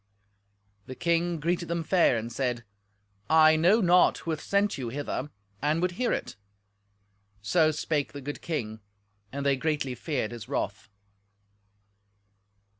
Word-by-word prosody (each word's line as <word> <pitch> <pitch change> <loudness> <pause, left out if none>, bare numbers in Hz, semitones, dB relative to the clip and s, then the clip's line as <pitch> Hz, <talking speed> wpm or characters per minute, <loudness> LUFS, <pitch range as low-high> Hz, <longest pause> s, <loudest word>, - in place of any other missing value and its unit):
The 130 - -7
king 170 +1 0
greeted 170 +2 -1
them 170 0 -2
fair, 170 -7 +3
and 115 +1 -5
said, 125 -3 -2 0.7
"I 160 0 +6
know 180 +8 +4
not 180 -1 +4
who 165 - -4
hath 155 - -3
sent 200 +1 +1
you 120 -3 -3
hither, 145 +1 -4 0.3
and 150 +3 +1
would 180 +1 0
hear 240 +7 -1
it." - - -3 1.1
So 155 +8 +3
spake 150 -1 -1
the 145 - -8
good 145 +2 -6
king, 110 -10 -4 0.5
and 140 +1 -4
they 140 -1 +3
greatly 145 -2 -1
feared 125 -4 -3
his 120 0 -9
wrath. 100 -8 -3
155 Hz, 140 wpm, -27 LUFS, 130-170 Hz, 1.1 s, I